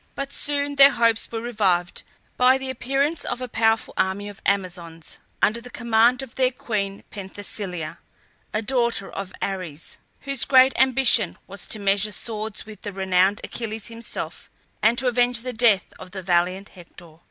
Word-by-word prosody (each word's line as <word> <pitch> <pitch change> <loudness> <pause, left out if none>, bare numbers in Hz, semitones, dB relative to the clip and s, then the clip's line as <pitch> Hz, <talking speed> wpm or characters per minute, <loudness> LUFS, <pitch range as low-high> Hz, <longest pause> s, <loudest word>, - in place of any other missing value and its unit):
But 275 0 -5
soon 285 0 -2
their 275 0 +9
hopes 230 -1 +3
were 225 -1 -3
revived 190 -7 0 0.3
by 255 +1 +5
the 265 0 -4
appearance 275 +5 -1
of 245 - -3
a 255 - -4
powerful 225 -1 +1
army 195 +2 0
of 205 - -12
Amazons 175 -4 -3 0.2
under 225 +3 +2
the 250 - -11
command 235 +1 +2
of 260 - -10
their 255 -1 +2
queen 205 -6 -3
Penthesilea, 190 -4 -6 0.5
a 215 - -1
daughter 235 -4 0
of 195 -1 -6
Ares, 180 -6 -5 0.2
whose 275 -2 -2
great 260 0 +6
ambition 255 -7 +4
was 200 0 -9
to - - -2
measure 200 +1 +1
swords 215 0 -5
with 215 -1 -12
the 205 - -5
renowned 190 +1 +2
Achilles 225 -2 -4
himself, 230 0 -7 0.3
and 225 +3 +4
to 260 - 0
avenge 245 -1 +2
the 250 +1 -5
death 220 -5 +2
of - - -10
the 190 0 -7
valiant 185 +2 +1
Hector. 170 -3 -15
220 Hz, 165 wpm, -23 LUFS, 195-245 Hz, 0.5 s, their